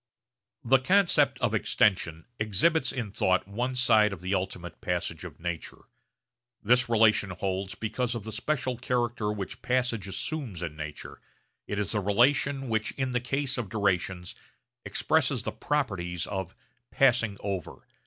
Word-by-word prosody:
The 130 Hz, +3 st, +5 dB
concept 190 Hz, +7 st, +3 dB
of -, -, +1 dB
extension 85 Hz, -6 st, +1 dB
exhibits 110 Hz, -, +2 dB
in 120 Hz, -6 st, -4 dB
thought 95 Hz, -1 st, +1 dB
one 120 Hz, +6 st, -2 dB
side 110 Hz, -4 st, +4 dB
of 95 Hz, -4 st, -7 dB
the 95 Hz, +2 st, -2 dB
ultimate 90 Hz, -2 st, -3 dB
passage 85 Hz, -2 st, -2 dB
of 80 Hz, -4 st, -9 dB
nature. 85 Hz, -2 st, -5 dB, 0.8 s
This 125 Hz, +3 st, +4 dB
relation 110 Hz, -3 st, +4 dB
holds 95 Hz, +1 st, -3 dB
because 120 Hz, +2 st, -2 dB
of 115 Hz, -, -4 dB
the 110 Hz, -, -6 dB
special 125 Hz, +2 st, -1 dB
character 120 Hz, -4 st, 0 dB
which 100 Hz, -3 st, -5 dB
passage 125 Hz, -5 st, 0 dB
assumes 110 Hz, -, -3 dB
in 80 Hz, -3 st, -4 dB
nature; 75 Hz, -1 st, -7 dB, 0.5 s
it 105 Hz, -, -3 dB
is 105 Hz, -1 st, -1 dB
the 105 Hz, -, +1 dB
relation 135 Hz, +7 st, +2 dB
which 110 Hz, -2 st, -1 dB
in 130 Hz, -2 st, -2 dB
the 125 Hz, -, +1 dB
case 135 Hz, +1 st, -1 dB
of 110 Hz, -5 st, -4 dB
durations 90 Hz, -3 st, -1 dB, 0.5 s
expresses -, -, +1 dB
the -, -, -2 dB
properties 95 Hz, -, -2 dB
of 95 Hz, -2 st, -4 dB, 0.3 s
'passing 120 Hz, -6 st, +3 dB
over.' 95 Hz, -4 st, -5 dB
105 Hz, 145 wpm, -28 LUFS, 95-125 Hz, 0.8 s, The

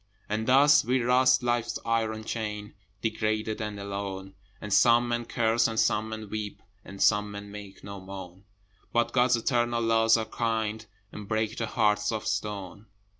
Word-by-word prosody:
And 110 Hz, +1 st, -2 dB
thus 140 Hz, +3 st, +6 dB
we 125 Hz, +3 st, +1 dB
rust 130 Hz, +1 st, +3 dB
Life's 120 Hz, -1 st, 0 dB
iron 110 Hz, -1 st, -1 dB
chain 105 Hz, -2 st, -5 dB, 0.3 s
Degraded 110 Hz, 0 st, -1 dB
and 105 Hz, -1 st, -4 dB
alone: 100 Hz, -1 st, -5 dB, 0.3 s
And 105 Hz, -1 st, -4 dB
some 120 Hz, +3 st, +5 dB
men 120 Hz, 0 st, -1 dB
curse, 115 Hz, 0 st, +2 dB
and 110 Hz, -1 st, -2 dB
some 110 Hz, +1 st, +1 dB
men 110 Hz, -1 st, -6 dB
weep, 105 Hz, -1 st, -5 dB, 0.2 s
And 100 Hz, 0 st, -11 dB
some 105 Hz, -1 st, +3 dB
men 100 Hz, 0 st, -8 dB
make 100 Hz, -1 st, -10 dB
no 100 Hz, -1 st, -8 dB
moan: 95 Hz, 0 st, -10 dB, 0.5 s
But 120 Hz, 0 st, +1 dB
God's 125 Hz, -1 st, +4 dB
eternal 120 Hz, 0 st, 0 dB
Laws 115 Hz, 0 st, +4 dB
are 110 Hz, -, -2 dB
kind 110 Hz, -2 st, -2 dB, 0.2 s
And 105 Hz, -1 st, -9 dB
break 110 Hz, +1 st, -1 dB
the -, -, -3 dB
heart 105 Hz, -3 st, +1 dB
of 110 Hz, -2 st, -4 dB
stone. 105 Hz, -1 st, -4 dB
110 Hz, 165 wpm, -27 LUFS, 105-115 Hz, 0.5 s, thus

